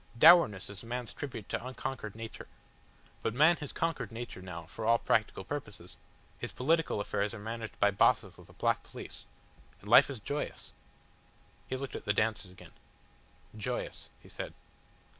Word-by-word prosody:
Dourness 115 - +7
is 100 - -8
man's 120 0 -4
tribute 120 -8 -6
to - - -2
unconquered 130 -4 -5
nature. 115 0 -8 0.7
But 115 - -1
man 155 +5 +6
has 145 -3 -6
conquered 160 -9 -1
nature 115 -4 -6
now 85 -3 -7
for 90 +7 -8
all 115 +1 +5
practical 110 -4 +1
purposes 105 -8 -6 0.4
his - - -4
political 160 -2 +1
affairs 105 +1 -1
are - - -8
managed 110 +1 -6
by 100 - +5
Bosses 95 - +3
with - - -16
a - - -15
black - - +1
police - - -10 0.5
and 100 - -14
life 135 +6 +8
is 135 -5 -5
joyous." 145 +8 -4 1.0
He 130 - -2
looked 135 0 -5
at - - -6
the 105 - +2
dancers 105 -2 0
again. 90 - -14 0.8
"Joyous," 120 +3 -4
he - - -14
said. - - -6
115 Hz, 160 wpm, -32 LUFS, 105-130 Hz, 1.0 s, life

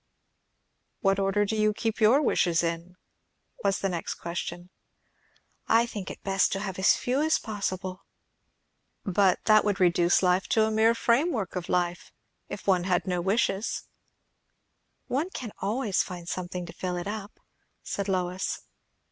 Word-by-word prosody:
"What 195 -2 +2
order 195 +1 +2
do 220 - -2
you 215 -1 +2
keep 225 0 -2
your 245 +8 +5
wishes 175 - +2
in?" 170 +2 -3 0.7
was 195 -1 +2
the 195 - -1
next 175 -2 -3
question. 175 +1 -6 1.0
"I 230 +1 +4
think 205 -5 -6
it - - -9
best 195 -1 +2
to 195 - -2
have 190 -2 -5
as 190 - +5
few 255 +3 0
as 315 +1 +3
possible." 190 -3 -4 1.0
"But 190 -1 +2
that 215 -1 +6
would 205 -1 0
reduce 175 0 +3
life 180 +1 +2
to 220 - +3
a 220 - -1
mere 220 +1 +4
framework 235 - +1
of 180 -2 -4
life, 175 -1 -1 0.4
if 200 - -7
one 185 -3 +2
had 180 -1 +1
no 180 -2 -1
wishes!" 195 +2 0 1.2
"One 295 +8 -1
can 245 - -6
find 195 -6 -1
something 180 0 -4
else - - -9
to - - -9
fill 180 -1 -3
it 175 - -4
up," 205 0 -6 0.4
said 200 0 -3
Lois. 185 0 -1
195 Hz, 155 wpm, -27 LUFS, 180-215 Hz, 1.2 s, that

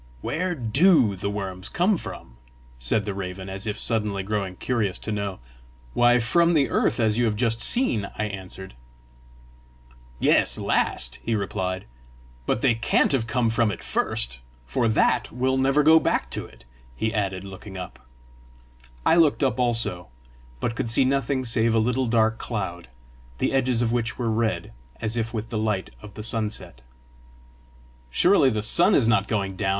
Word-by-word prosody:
"Where 180 +3 -2
DO 125 - +3
the 100 - -3
worms 95 -2 -4
come 190 +4 +2
from?" 65 - -9 0.4
said 80 - 0
the 100 - -3
raven, 95 0 -6
as 95 +2 -5
if 105 0 -3
suddenly 105 -4 -1
grown 100 -2 -3
curious 105 -4 -1
to 110 - -5
know. 100 -2 -3 0.6
"Why, 120 0 +4
from 170 +9 +2
the 140 -4 +2
earth, - - +1
as 110 0 +1
you 120 - +3
have 110 -2 0
just 115 0 0
seen!" 120 - +2
I - - -1
answered. 95 - -7 1.5
"Yes, - - +3
last!" 65 0 -1
he 115 - -1
replied. 95 -2 -3 0.6
"But 110 - 0
they 130 -3 +3
can't 115 +1 +1
have 125 -5 +1
come 115 -1 +1
from 115 -1 +2
it 100 - -6
first - - 0 0.3
for 90 - 0
that 110 - +1
will 130 +2 0
never 135 +3 +3
go 160 +2 +7
back - - -1
to - - -4
it!" - - -20 0.3
he 110 - -2
added, 95 -3 -2
looking 95 0 -10
up. 90 - -8 1.1
I - - +5
looked 155 -3 +3
up 130 -3 0
also, 115 -7 +1 0.5
but 115 - -2
could 115 - -2
see 120 +3 +3
nothing 135 0 0
save 115 -1 +1
a - - +3
little 125 +3 +1
dark 110 -1 +2
cloud, 95 - -4 0.5
the - - -1
edges 130 -3 +2
of 115 - 0
which 115 -2 -2
were 115 -3 -1
red, 110 0 -1 0.3
as 110 0 -2
if 115 -1 -2
with 115 -1 -5
the 110 - -3
light 105 -3 -2
of 105 -2 -12
the 105 - -7
sunset. 110 - -1 1.3
"Surely 150 - +4
the 110 -3 -2
sun 175 - +5
is 115 - +3
not 110 -4 +2
going 100 -3 -2
down!" 95 - -1
110 Hz, 170 wpm, -24 LUFS, 100-125 Hz, 1.5 s, go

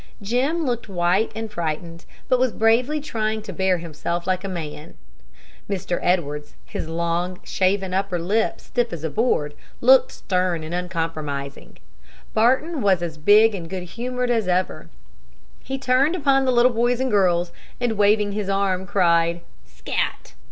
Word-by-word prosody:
Jim 260 +10 0
looked 240 -4 -2
white 180 +3 +1
and 225 -1 -5
frightened, 165 -1 -4 0.2
but 255 - +3
was 255 -1 +2
bravely 240 +8 +2
trying 220 -6 -2
to 210 -3 -8
bear 190 +1 +1
himself 170 +1 -4
like 185 0 0
a - - -3
man. 160 -3 -7 0.7
Mr. 185 -3 -2
Edwards, 150 -5 -1
his 160 - -5
long, 170 +2 -2
shaven 190 0 0
upper 190 -1 0
lip 205 +7 0
stiff 240 -2 -2
as 165 -2 -6
a 160 - -2
board, 150 -10 +1 0.3
looked - - +5
stern 180 -3 -1
and 160 +2 -6
uncompromising. 160 -6 -4 0.6
Barton 260 +7 +2
was 190 -4 +3
as 160 -2 -5
big 210 +7 +6
and 170 -4 -6
good 185 0 -4
humored 245 +6 -3
as 225 -5 +1
ever. 180 0 -1 0.7
He 270 - -4
turned 270 +5 +2
upon 275 -5 +2
the 260 - +3
little 245 0 +4
boys 240 +1 +1
and 260 -1 0
girls, 175 -4 +2 0.3
and, 245 -2 0
waving 210 -1 +3
his 205 -1 -3
arm, 195 -1 0
cried, 170 -3 +2 0.3
"Scat!" - - -3
195 Hz, 155 wpm, -23 LUFS, 170-235 Hz, 0.7 s, big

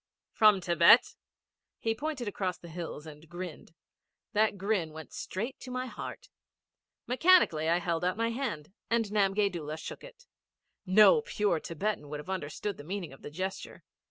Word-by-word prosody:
'From 210 -4 +5
Thibet.' 170 +6 +5 0.6
He 225 - 0
pointed 275 -1 -4
across 190 -3 -2
the 170 - -12
hills 165 -2 -6
and 155 0 -12
grinned. 175 -2 -8 0.6
That 210 -1 +2
grin 190 -5 -1
went 160 0 -10
straight 225 +8 -5
to 255 - -9
my 255 0 -3
heart. - - -8 0.8
Mechanically 250 - +4
I 170 - +4
held 170 -1 -2
out 180 +2 0
my 230 0 0
hand 210 - -4 0.2
and 230 -1 +2
Namgay 200 -1 +2
Doola 155 -3 -5
shook - - -8
it. - - -14 0.6
No 215 - +7
pure 205 - 0
Thibetan 165 -1 -3
would 150 0 -5
have 165 +6 -7
understood 190 +3 -4
the - - -9
meaning 180 -2 -5
of 135 - -15
the - - -7
gesture. 185 +5 -5
190 Hz, 160 wpm, -30 LUFS, 165-220 Hz, 0.8 s, No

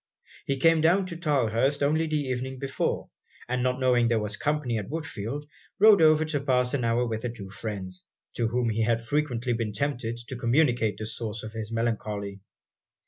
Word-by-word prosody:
He 140 - 0
came 165 +3 +4
down 180 +4 +4
to 175 -2 -5
Tylehurst 140 -3 +1
only 155 +3 +2
the 155 -1 0
evening 130 -1 -3
before; 135 +1 -2 0.4
and 125 +1 -1
not 125 +1 0
knowing 125 -2 +3
there 115 -1 +2
was 105 -1 -2
company 145 -4 -1
at 105 - -7
Woodfield, 145 -3 -4 0.3
rode 210 -3 +7
over 155 0 +5
to 155 -2 -1
pass 125 -2 +1
an 135 -4 0
hour 115 +1 +2
with 110 -2 -3
the 125 - -2
two 100 -5 -9
friends, 95 -3 -6 0.3
to 115 - +1
whom 120 0 0
he 110 +1 -1
had 115 +1 +2
frequently 125 -1 -1
been 115 -2 -2
tempted 120 -1 -2
to 130 - -4
communicate 120 -4 +2
the 110 - -5
source 110 -1 -5
of 110 - -6
his 110 -1 -5
melancholy. 105 -3 -2
125 Hz, 190 wpm, -27 LUFS, 110-145 Hz, 0.4 s, rode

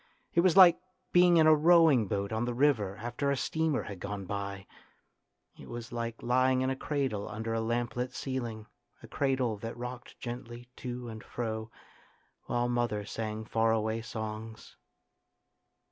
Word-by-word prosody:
It - - +3
was 175 0 +4
like 180 -3 +9 0.3
being 175 -1 +6
in 160 - +6
a 155 - +8
rowing 155 - +5
boat 100 -1 -2
on 110 +2 0
the 120 -1 -3
river 115 -8 +2
after 120 +4 -2
a 140 - +1
steamer 160 +1 0
had 100 -3 -8
gone 100 +1 -5
by. 100 0 -4 0.9
It - - -11
was 120 -1 -7
like 115 -1 -4
lying 130 +1 +3
in 130 0 +1
a - - -1
cradle 135 -8 -2
under 110 +1 -4
a 115 - 0
lamplit 120 +2 -2
ceiling, 120 -5 -4 0.4
a - - -10
cradle 130 -5 0
that 115 +3 -6
rocked 125 0 -8
gently 120 0 -7
to 125 -1 -5
and 110 0 -8
fro 110 -2 -4 0.8
while 120 0 0
mother 120 -4 -1
sang 110 0 -4
far 115 0 +2
away 110 0 0
songs. 110 -1 -7
120 Hz, 160 wpm, -30 LUFS, 110-130 Hz, 0.9 s, like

